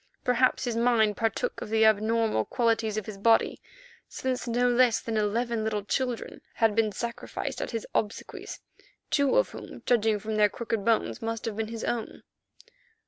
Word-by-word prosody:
Perhaps 250 +1 +2
his 240 -3 -2
mind 230 -3 +3
partook 225 +1 -1
of - - -6
the 220 0 +4
abnormal 220 - +2
qualities 225 - 0
of 215 - -2
his 205 -2 -8
body, 225 +2 +3 0.5
since 260 -1 -3
no 245 +1 +2
less 245 -2 +4
than 225 - -4
eleven 220 +2 0
little 210 -2 -2
children 250 +1 -2
had 225 -2 +3
been 220 -2 +2
sacrificed 235 +4 -5
at - - -3
his 230 -2 -4
obsequies, 210 -1 -3 0.5
two 285 -2 +3
of - - +3
whom, - - -10
judging 220 -3 +3
from 215 +1 -4
their 210 -1 +5
crooked 225 -1 -3
bones, 225 +1 +1
must 225 0 -3
have 225 -2 -3
been 220 0 -2
his 225 0 -6
own. 235 -2 -3
225 Hz, 170 wpm, -27 LUFS, 215-235 Hz, 0.5 s, their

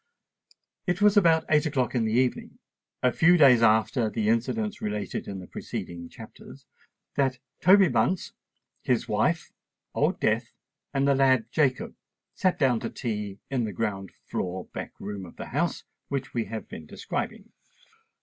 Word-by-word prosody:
It 180 0 0
was 210 0 +5
about 165 -5 +4
eight 155 +1 +3
o'clock 130 -5 0
in 120 -3 +1
the 110 - 0
evening, 125 +1 0 0.5
a 125 - +4
few 175 +7 +5
days 130 -7 +7
after 110 +1 +3
the 110 -1 -1
incidents 210 - -1
related 105 -1 -3
in 100 - -5
the 95 - -8
preceding 85 -1 -6
chapters, - - -13 0.5
that 135 -2 +1 0.2
Toby 190 +1 +6
Bunce, 185 0 0 0.5
his - - 0
wife, - - 0 0.4
Old - - +1
Death, - - 0 0.4
and 135 0 +1
the 140 - +5
lad 130 -4 +3
Jacob 135 -4 +1 0.4
sate 185 -1 +1
down 130 -5 +3
to - - -4
tea 105 -4 -4
in 125 -4 0
the 105 - -5
ground 95 -2 -3
floor 90 0 -3
back - - -7
room 100 -1 -6
of 90 - -11
the - - -7
house - - 0 0.2
which 135 -1 -4
we 115 -2 -1
have 110 -1 -6
been 80 - -9
describing. - - -5
125 Hz, 160 wpm, -27 LUFS, 105-145 Hz, 0.5 s, days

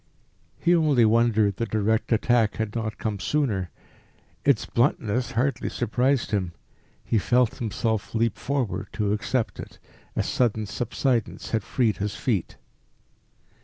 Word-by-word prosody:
He 175 - +2
only 150 -8 +4
wondered 110 -3 +3
the 115 - -1
direct 110 +2 0
attack 115 -1 +3
had 110 -1 -3
not 110 -2 -3
come 105 -3 -3
sooner. 105 -8 0 0.7
Its 140 -6 +3
bluntness 120 -1 0
hardly 130 +4 0
surprised 125 +2 0
him. 95 -4 -1 0.5
He 110 - +2
felt 125 +3 +2
himself 110 -1 -2
leap 115 0 +1
forward 125 -8 -2
to 105 -1 0
accept 115 +3 -1
it. - - -9 0.4
A - - +1
sudden 110 -3 0
subsidence 120 +2 -2
had 110 - +1
freed 110 +2 0
his 105 +1 -3
feet. 105 -9 -2
115 Hz, 130 wpm, -25 LUFS, 105-125 Hz, 0.7 s, only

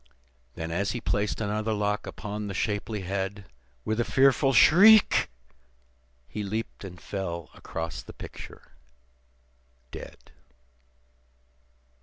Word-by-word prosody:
Then, 80 0 -5
as 100 +4 -1
he 120 - -3
placed 105 -2 -1
another 110 +1 -1
lock 105 0 -1
upon 105 0 -5
the 100 - -5
shapely 105 +1 -2
head, 95 +1 -3 0.4
With 110 +1 -1
a - - +3
fearful 135 +2 +4
shriek, 200 - +7 1.0
he 105 - -5
leaped 105 +2 -4
and 90 -2 -9
fell 85 -4 -5
across 80 0 -5
the - - -11
picture - - -11 1.2
dead. - - -11
105 Hz, 110 wpm, -27 LUFS, 95-110 Hz, 1.2 s, shriek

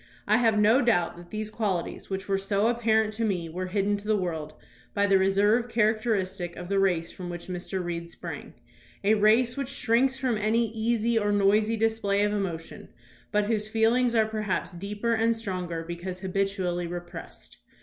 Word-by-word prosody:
I 215 +1 +4
have 225 -3 +3
no 220 +6 +5
doubt 175 -8 +2
that 175 0 -12
these 215 0 -4
qualities 200 -6 -3
which 190 0 -4
were 195 -1 +1
so 200 +1 0
apparent 220 -2 +2
to 225 +1 -2
me 180 -6 -1
were 185 +3 -4
hidden 200 +2 0
to 205 +1 -9
the 215 -1 +3
world 160 -5 -3 0.4
by 200 0 +3
the 195 -1 +4
reserve 205 +5 +3
characteristic 215 -5 0
of 180 0 -8
the 200 0 +2
race 180 -4 +1
from 180 -1 -7
which 175 -1 -6
Mr. 185 +1 -4
Reed 170 -1 -4
sprang - - -8 0.2
— - - -27
a 205 +2 +4
race 220 +3 +4
which 275 -2 -3
shrinks 260 0 +2
from 250 -5 0
any 225 +2 +1
easy 230 0 +1
or 205 -1 0
noisy 210 +2 +3
display 220 -2 +1
of 210 0 +1
emotion, 175 -6 -4 0.4
but 210 -1 +2
whose 215 -1 -1
feel 225 +1 +3
ings 245 -1 +2
are 220 -1 +4
perhaps 215 -3 -2
deeper 205 +6 -2
and 230 +1 +2
stronger 180 -6 -4
because 175 +2 -6
habitually 190 -2 -1
repressed. 175 -1 -8
205 Hz, 185 wpm, -27 LUFS, 185-225 Hz, 0.4 s, no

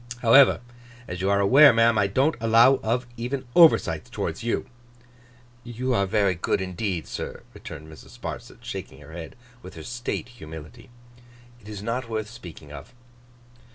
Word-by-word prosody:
However, 125 +2 +6 0.5
as 90 +1 -6
you 95 - 0
are 100 0 +3
aware, 135 +9 +7
ma'am, 115 0 +3
I 100 - +3
don't 135 +10 +2
allow 115 +4 +5
of 120 +3 -1
even 130 +3 -4
oversights 155 - +4
towards - - -4
you.' 115 - -1 1.0
'You 125 +2 -3
are 100 -4 +1
very 100 -1 +2
good 85 - -1
indeed, 95 -2 -3
sir,' - - -7
returned 80 +2 -10
Mrs. 80 -1 -14
Sparsit, - - -8
shaking 65 - -7
her 75 +2 -13
head 85 -1 -8 0.3
with - - -12
her - - -9
State 120 0 -5
humility. 80 - -11 0.7
'It 105 -2 -14
is 105 -2 -7
not 115 +2 -3
worth 110 -1 -4
speaking 85 -10 -12
of. 120 - -11
110 Hz, 155 wpm, -25 LUFS, 90-120 Hz, 1.0 s, aware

